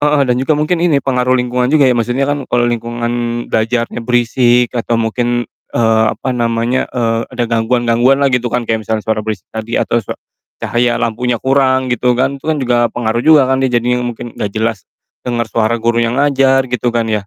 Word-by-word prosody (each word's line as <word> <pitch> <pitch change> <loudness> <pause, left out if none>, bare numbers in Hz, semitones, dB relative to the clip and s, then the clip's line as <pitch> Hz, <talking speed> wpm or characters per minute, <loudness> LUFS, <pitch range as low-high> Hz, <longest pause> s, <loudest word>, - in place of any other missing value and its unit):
heeh, 145 0 +2
dan 125 -2 +1
juga 145 +3 +1
mungkin 155 +3 0
ini, 150 -7 +1
pengaruh 125 -1 +1
lingkungan 125 0 0
juga 150 0 +4
ya, 130 - +4
maksudnya 120 +3 0
kan 145 -1 -3
kalo 120 0 +1
lingkungan 120 0 -2
belajarnya 115 +2 -1
berisik 120 0 +2
atau 120 -1 -1
mungkin, 120 +1 -1 0.3
eee, 110 -1 +3
apa 130 - -3
namanya, 120 +1 -1
eee, 115 -2 -1
ada 125 -1 -2
gangguan-gangguan 120 +2 +2
lah 135 - +2
gitu 125 -1 0
kan, 120 +1 -2
kayak 110 -1 -3
misalnya 110 -1 -1
suara 110 -1 0
berisik 105 -4 -5
tadi 110 +1 -4
atau 120 - +1
sua 105 - -7 0.5
cahaya 120 0 +1
lampunya 120 +1 -1
kurang 130 0 +1
gitu 125 +1 +1
kan, 135 +2 -1
itu - - -35
kan 155 - +1
juga 120 -3 +1
pengaruh 115 0 -2
juga 155 -1 +5
kan, 130 0 0
dia 135 - +1
jadinya 125 0 0
mungkin 120 -1 -5
nggak 105 - -3
jelas 110 -2 -2 0.4
dengar 120 -1 -1
suara 115 +1 0
gurunya 115 0 0
ngajar, 135 +1 +2
gitu 125 0 0
kan 115 -1 0
ya? 110 - -3
120 Hz, 195 wpm, -15 LUFS, 115-130 Hz, 0.5 s, juga